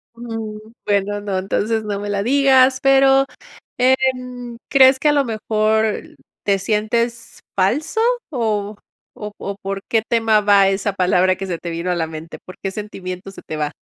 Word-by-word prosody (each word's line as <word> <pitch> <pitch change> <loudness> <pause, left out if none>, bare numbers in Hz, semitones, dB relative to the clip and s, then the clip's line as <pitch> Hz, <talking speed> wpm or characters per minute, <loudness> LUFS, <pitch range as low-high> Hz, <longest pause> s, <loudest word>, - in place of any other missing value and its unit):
Mm, 225 -2 -6 0.3
bueno, 205 0 0
no, 200 -2 -2
entonces 215 +4 -1
no 205 -2 -3
me 205 0 -5
la 200 -1 -1
digas, 265 +1 +4
pero, 270 0 +5 0.5
¿em, 250 -2 0
crees 265 -1 +6
que 300 - +2
a - - +5
lo 285 -1 +2
mejor 220 -1 0 0.4
te 200 -1 +2
sientes 225 +4 -2 0.2
falso 255 - 0 0.3
o 215 -6 -2 0.4
o 210 -1 -8
o 200 0 -5
por 195 0 -4
qué 225 -1 +2
tema 225 -2 +3
va 200 -1 +5
esa 195 +1 -1
palabra 185 0 +2
que 195 - -5
se 175 -3 -3
te 170 - -6
vino 170 +2 -3
a - - +1
la 165 -2 -1
mente? 160 +1 -9
¿Por 185 - -11
qué 195 - -2
sentimiento 190 -2 -7
se 195 - -12
te 155 - -6
va? 150 -1 -2
210 Hz, 175 wpm, -19 LUFS, 195-245 Hz, 0.5 s, crees